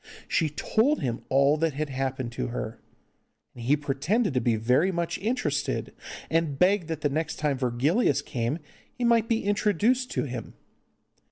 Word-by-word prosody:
She 160 -3 +1
told 230 - +1
him 120 -2 -2
all 140 +3 +4
that 160 -1 0
had 150 +2 -3
happened 130 -2 -2
to 120 - -3
her, 115 -1 -5 0.7
and 120 -2 -9
he 145 +4 +4
pretended 150 - 0
to 125 - +1
be 120 -2 +2
very 125 - +2
much 170 -2 -2
interested, 235 +6 -1 0.3
and 160 -4 0
begged 180 +1 +3
that 160 -2 -4
the - - +2
next 160 +3 -2
time 145 -3 -1
Virgilius 140 - +2
came 120 +3 -2 0.4
he 250 - -3
might 230 -1 +3
be 230 -1 +1
introduced 210 +5 +2
to - - 0
him. 125 -5 -6
150 Hz, 165 wpm, -27 LUFS, 130-200 Hz, 0.7 s, all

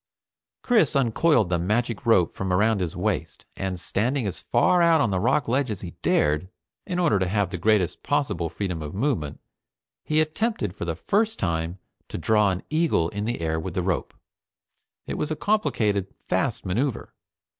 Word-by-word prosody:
Chris 225 - +3
uncoiled 125 - +3
the 85 -1 +1
magic 110 +5 -1
rope 90 -7 +4
from 95 -1 -3
around 105 +2 +2
his 85 -3 -3
waist, - - -2
and 95 -2 -3
standing 120 - -1
as 95 - -4
far 180 -1 +3
out 165 -1 +5
on 115 -8 +2
the 95 - +1
rock 130 +8 +1
ledge 130 +2 +1
as 105 -4 -4
he 90 - -6
dared, 75 +5 +1 0.4
in 180 -2 -2
order 165 - +3
to 95 - 0
have 100 -1 0
the - - -3
greatest 100 -2 +2
possible 135 - -1
freedom 90 -4 -4
of 75 +2 -6
movement, 100 - -1 0.6
he 155 0 +1
attempted 155 - -1
for - - -5
the 85 -1 -2
first 220 - 0
time 85 +1 -2 0.3
to - - -5
draw 105 +3 +3
an 95 -1 -3
eagle 155 - +2
in 105 +2 -4
the 115 -6 -2
air 80 -1 -1
with 85 +2 -6
the 90 - 0
rope. 90 -2 -2 0.9
It - - -4
was 150 - -1
a 155 - -1
complicated, 110 - 0 0.2
fast - - -1
maneuver. 120 +8 -2
105 Hz, 180 wpm, -25 LUFS, 90-140 Hz, 0.9 s, out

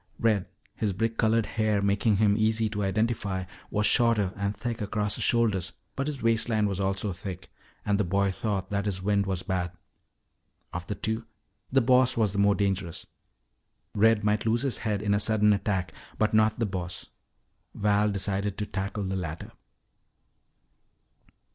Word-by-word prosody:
Red, 110 -5 +1 0.3
his 105 -3 -1
brick 115 +4 -1
colored 110 0 +2
hair 110 -2 0
making 100 +2 +2
him 100 0 +3
easy 110 +1 +2
to 105 -1 -3
identify, 100 -1 0 0.3
was 105 0 0
shorter 105 -5 +4
and 100 +1 -2
thick 115 +1 -4
across 105 0 -1
the - - -3
shoulders, 105 -7 +2 0.2
but 135 +1 -2
his 145 -5 -4
waistline 115 -1 +2
was 100 -1 -3
also 95 0 -1
thick 95 0 -8 0.3
and 100 -1 +1
the - - +3
boy 100 +2 +1
thought 100 0 -3
that 100 0 -1
his 95 -2 -2
wind 100 0 +1
was 95 -2 -2
bad. 90 -3 -2 1.0
Of 90 0 -5
the 105 - -3
two, 110 +3 -3 0.4
the 135 +1 +4
Boss 130 +1 +4
was 105 -4 +2
the 100 - -1
more 100 0 +4
dangerous. 95 -3 -2 0.9
Red 110 0 +4
might 105 +1 +1
lose 115 +3 +2
his 135 -3 0
head 105 -2 -2
in 100 -1 +2
a 100 - +2
sudden 105 -1 +3
attack, 95 -4 -1 0.2
but 110 0 +1
not 110 0 +3
the 115 - 0
Boss. 90 -3 -5 0.6
Val 105 0 +2
decided 100 0 -2
to 105 - -2
tackle 100 +1 -3
the 95 0 -2
latter. 80 -4 -5
105 Hz, 165 wpm, -27 LUFS, 95-110 Hz, 1.0 s, shorter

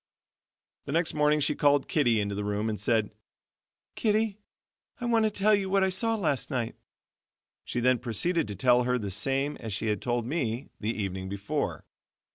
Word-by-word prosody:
The - - -5
next 165 +1 +3
morning 150 0 +3
she - - +2
called 145 -1 +3
Kittie 120 -8 +2
into 100 -1 -1
the 105 +1 -3
room 105 +2 -1
and 105 - -4
said: 110 0 +1 0.8
"Kittie, 215 -1 0 0.6
I 245 - -4
want 230 -2 +3
to - - +3
tell 210 +1 +2
you 195 -2 +1
what 195 0 +3
I 190 - +3
saw 225 +5 +1
last 155 - -1
night." 125 -5 -2 0.9
She - - -2
then 125 0 +3
proceeded 130 - -1
to 105 - -5
tell 125 +5 +4
her 125 0 +1
the 100 -4 -4
same 135 +8 0
as 110 -3 -6
she 110 - -3
had 105 - -1
told 120 -1 -1
me 125 -3 -2
the 105 - -2
evening 95 -4 -4
before. 100 +1 -3
125 Hz, 185 wpm, -28 LUFS, 105-170 Hz, 0.9 s, tell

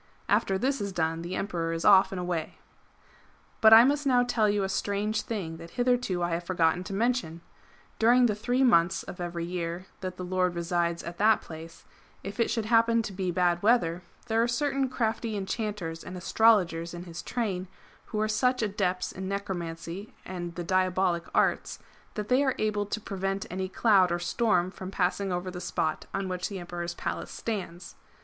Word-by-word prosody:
After 195 - +2
this 265 +5 0
is 200 -1 -2
done, 165 -2 -1
the 175 +2 -4
Emperor 170 -5 -2
is 165 - -3
off 195 -2 +7
and 190 - -4
away.'' 175 -3 -3 1.0
But 220 - +8
I 225 +1 +11
must 285 +2 +1
now 250 -2 +4
tell 220 -3 +2
you 205 -1 +1
a - - 0
strange 205 +2 -1
thing 180 -8 -4
that 165 +1 -10
hitherto 245 -8 +1
I 175 - 0
have 170 +1 -1
forgotten 175 -1 +1
to 200 - -6
mention. 225 -7 0 0.6
During 245 +2 +5
the 220 - +2
three 245 +5 0
months 175 -7 +4
of 180 - -8
every 170 -1 -3
year 175 0 -4
that 185 -1 -5
the 180 - -5
Lord 180 -1 0
resides 170 0 -1
at 170 0 -8
that 215 +2 +4
place, 160 +1 -11 0.4
if 200 +2 -7
it 230 - +2
should 225 -2 -1
happen 230 0 +3
to 205 - -6
be 185 -1 -2
bad 175 0 +1
weather, 190 -6 +2 0.2
there 225 -1 +1
are 235 - +2
certain 270 +2 0
crafty 225 -3 -1
enchanters 195 -5 -4
and 185 - -7
astrologers 180 -4 +2
in 175 - -7
his 170 -1 -7
train, 195 -6 -2 0.4
who 215 - -4
are 215 - +1
such 250 +3 +1
adepts 190 -3 -1
in 190 0 -6
necromancy 190 -1 -5
and 175 -2 -6
the 175 - -4
diabolic 185 -1 +1
arts, - - +1 0.4
that 210 -1 -3
they 255 +4 +3
are 265 -2 +1
able 210 -1 0
to 220 - -3
prevent 195 -1 -3
any 185 +1 -3
cloud 195 -4 +4
or 175 - +1
storm 180 0 +1
from 185 -1 -8
passing 190 +1 0
over 180 +1 -2
the 180 0 -7
spot 155 -3 -2
on 195 -1 -2
which 180 -1 -3
the 200 - -5
Emperor's 175 -1 -5
Palace - - -4
stands. 185 -6 -5
190 Hz, 190 wpm, -28 LUFS, 175-220 Hz, 1.0 s, I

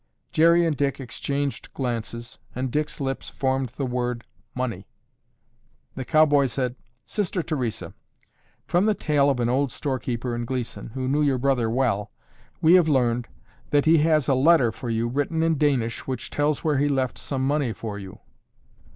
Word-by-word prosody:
Jerry 170 +2 +5
and 160 -2 +1
Dick 140 0 -1
exchanged 140 +2 -3
glances 120 -2 -4 0.2
and 130 0 -2
Dick's 150 +2 -2
lips 135 -1 -3
formed 130 -2 -1
the 135 +3 -4
word 125 -2 -2 0.3
"money." 115 -7 -3 1.1
The 130 - -5
cowboy 145 -2 +4
said, 125 0 -2 0.3
"Sister 190 -4 -2
Theresa, 125 -9 -3 0.7
from 175 +3 +2
the 215 -1 +3
tale 145 -5 +2
of 135 -3 0
an 120 - +1
old 130 +2 +1
storekeeper 125 -2 -3
in 120 0 -3
Gleeson, 125 -1 -4
who 130 -1 -2
knew 145 +3 +1
your 140 -3 +2
brother 125 -3 +1
well, 115 -4 0 0.5
we 160 +2 +6
have 180 -3 +6
learned 120 -4 +1 0.4
that 145 0 +3
he 160 0 +6
has 155 -3 +3
a 135 - +4
letter 135 -2 +4
for 120 +2 -7
you 115 +1 0
written 145 +6 -1
in 165 0 +2
Danish 130 -6 0
which 130 -3 -4
tells 145 0 0
where 150 -4 +1
he 145 - +2
left 130 -3 -1
some 130 -2 -2
money 140 -3 +1
for 105 -2 -6
you." 95 -1 -10
135 Hz, 170 wpm, -24 LUFS, 120-150 Hz, 1.1 s, we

